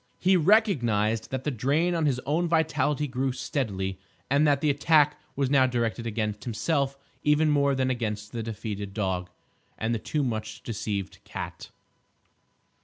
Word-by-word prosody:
He 190 +1 +3
recognised 125 - +3
that 130 -1 -3
the 150 - -1
drain 145 +8 +1
on 165 -3 +1
his 130 -3 +1
own 160 +6 +1
vitality 150 -3 +1
grew 130 0 -1
steadily, 100 -8 -3 0.3
and 145 +2 +4
that 140 -1 +3
the 150 0 +2
attack 150 +1 +4 0.2
was 135 -1 0
now 130 -2 +5
directed 115 -1 -1
against 105 -2 -2
himself 135 +4 -1 0.2
even 150 +1 +3
more 140 -1 +3
than 130 0 +1
against 105 -4 -3
the 115 - -4
defeated 105 -3 -5
dog, 95 -4 -1 0.5
and 110 +1 -1
the 115 - -1
too 150 +6 -1
much 110 -3 -4
deceived 105 -3 -4
cat. - - -7
130 Hz, 155 wpm, -27 LUFS, 110-150 Hz, 0.5 s, now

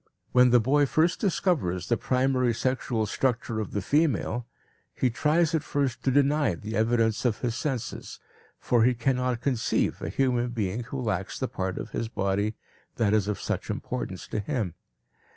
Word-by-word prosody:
When 125 0 +6
the 125 0 +6
boy 140 +5 +3
first 165 +6 +2
discovers 150 - 0
the 120 - +3
primary 125 -1 +1
sexual 125 -2 0
structure 115 0 -1
of 105 - -3
the 100 - -3
female, 125 - +1 0.5
he 125 - +1
tries 155 +6 +2
at 160 - +2
first 140 -5 -1
to - - +2
deny 140 - +3
the 110 +6 -6
evidence 110 0 +2
of 120 -4 0
his 120 -2 0
senses, 130 -1 -4 0.4
for 120 -2 +2
he 125 +1 +4
cannot 125 0 0
conceive 125 -4 0
a - - -3
human 125 -2 +1
being 115 0 -2
who 135 +2 -5
lacks 100 -6 -2
the 130 - -1
part 95 -4 -3
of 110 - -6
his 115 - -2
body 100 0 -1 0.4
that 105 -3 +2
is 105 -2 +2
of 105 - -2
such - - -3
importance - - -4
to - - -2
him. 105 - -2
120 Hz, 170 wpm, -27 LUFS, 110-135 Hz, 0.5 s, When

